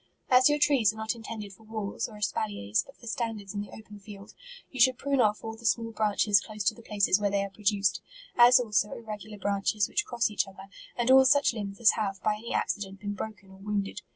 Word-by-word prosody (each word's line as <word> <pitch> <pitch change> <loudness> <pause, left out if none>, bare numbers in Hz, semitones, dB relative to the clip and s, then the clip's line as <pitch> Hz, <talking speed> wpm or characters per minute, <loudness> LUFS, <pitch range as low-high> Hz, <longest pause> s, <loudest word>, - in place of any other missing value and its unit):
As 255 +2 +6
your 295 - +2
trees 280 -8 +3
are - - -15
not 220 0 -2
intended 220 -3 -8
for 195 - -19
walls, 215 -2 -4
or 215 - -12
espaliers, 200 - -1
but 275 - -18
for - - -15
standards 220 -4 -4
in 205 - -3
the 205 - -8
open 210 -2 -12
field, 200 0 -12 0.4
you 260 - -8
should 255 0 +5
prune 275 -1 +1
off 210 -1 +1
all 225 0 -5
the 225 - -16
small 230 0 0
branches 210 -2 +2
close 215 -2 -6
to 180 - +2
the 235 - -14
places 205 -3 +2
where 205 - +2
they 200 0 0
are 200 - -6
produ 205 0 -1
ced, 180 - +2 0.3
as 245 +2 +7
also 210 -4 0
irregular 215 -2 -8
branches 200 +1 0
which 295 - 0
cross 235 -3 -1
each 210 - 0
other, 195 0 -13 0.3
and 240 +1 +2
all 265 0 +8
such 285 -1 +4
limbs 200 -3 -6
as 235 -1 +6
have, 195 -3 -3
by 210 0 +1
any 230 +2 -8
accident, 195 -2 -2
been 205 0 -4
broken 205 -1 -8
or 190 - -14
wounded. 205 0 -3
210 Hz, 235 wpm, -28 LUFS, 200-230 Hz, 0.4 s, all